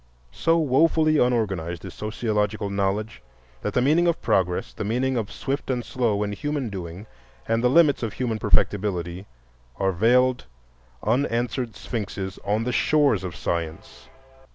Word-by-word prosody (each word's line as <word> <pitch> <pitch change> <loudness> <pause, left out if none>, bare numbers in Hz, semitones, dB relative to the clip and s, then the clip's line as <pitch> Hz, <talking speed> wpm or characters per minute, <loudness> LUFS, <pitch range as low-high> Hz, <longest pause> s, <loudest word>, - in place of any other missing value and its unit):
So 165 - +2
wofully 155 +1 +3
unorganized 95 -9 0
is - - -8
sociological 105 -2 -2
knowledge 100 - -1 0.4
that - - -3
the 125 - +3
meaning 160 +6 +4
of 170 -1 +1
progress, 90 - 0
the - - -5
meaning 125 +5 0
of 110 -4 -2
"swift" 135 +1 -3
and 125 -2 -1
"slow" 115 -6 0
in 105 - -2
human 145 +3 -2
doing, 90 +1 -7 0.4
and 115 +1 +1
the 125 - +4
limits 150 0 +4
of 115 -3 -3
human 115 -4 -2
perfectability, 95 -4 0 0.5
are 95 -1 +1
veiled, 125 - +3 0.6
unanswered 120 -1 0
sphinxes 100 -4 -5
on 105 +2 0
the 125 - -1
shores 140 -8 +3
of 90 -4 -5
science. 85 +5 -4
110 Hz, 145 wpm, -24 LUFS, 100-130 Hz, 0.6 s, meaning